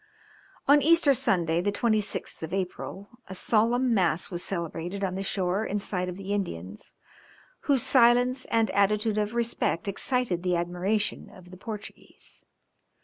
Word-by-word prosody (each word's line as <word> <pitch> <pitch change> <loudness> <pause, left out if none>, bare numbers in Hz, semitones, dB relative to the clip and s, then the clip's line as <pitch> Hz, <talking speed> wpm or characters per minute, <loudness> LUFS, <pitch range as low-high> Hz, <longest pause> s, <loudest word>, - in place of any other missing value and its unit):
On 290 +1 +6
Easter 320 -1 +5
Sunday, 170 -8 +1
the 205 +3 0
26th 215 -1 -1
of 165 +3 -4
April, 195 +4 -6
a 190 - -8
solemn 235 +5 +2
mass 180 -3 +1
was 175 -1 -3
celebrated 175 +1 -4
on 185 -2 -1
the 190 - -3
shore 195 +1 -1
in 210 - -2
sight 180 -2 -3
of 180 - -7
the 195 +1 -4
Indians, 100 - -5 0.8
whose 270 -4 +4
silence 250 +1 +4
and 225 -2 +1
attitude 210 +2 +1
of 210 +2 -2
respect 235 -6 -1
excited 200 -2 0
the 180 -1 0
admiration 180 +5 -1
of 180 -3 -15
the 185 - -11
Portuguese. 210 +1 -10
200 Hz, 145 wpm, -27 LUFS, 180-230 Hz, 0.8 s, On